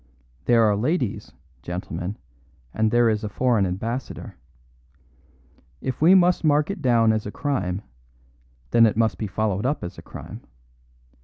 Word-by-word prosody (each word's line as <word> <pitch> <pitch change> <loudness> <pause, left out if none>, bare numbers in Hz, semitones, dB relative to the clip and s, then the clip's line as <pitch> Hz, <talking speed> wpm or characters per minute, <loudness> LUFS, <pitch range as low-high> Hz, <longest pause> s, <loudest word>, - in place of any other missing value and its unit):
There 120 -1 +4
are 105 -2 +3
ladies, 125 - -1 0.3
gentlemen, 90 +3 -5 0.6
and 110 0 +1
there 120 +1 +3
is 110 -1 0
a 105 - -3
foreign 115 -5 +1
ambassador. 115 +8 -5 1.4
If 130 0 -4
we 175 +5 +7
must 180 -1 +4
mark 150 +2 +2
it 195 -4 -6
down 115 -4 +4
as 110 -1 -2
a - - -5
crime, 100 -11 -2 0.9
then 115 -1 +6
it 105 - -1
must 115 -1 +1
be 110 - -2
followed 105 0 -1
up 145 - -2
as 85 - -7
a - - -9
crime. - - -10
115 Hz, 150 wpm, -24 LUFS, 105-130 Hz, 1.4 s, we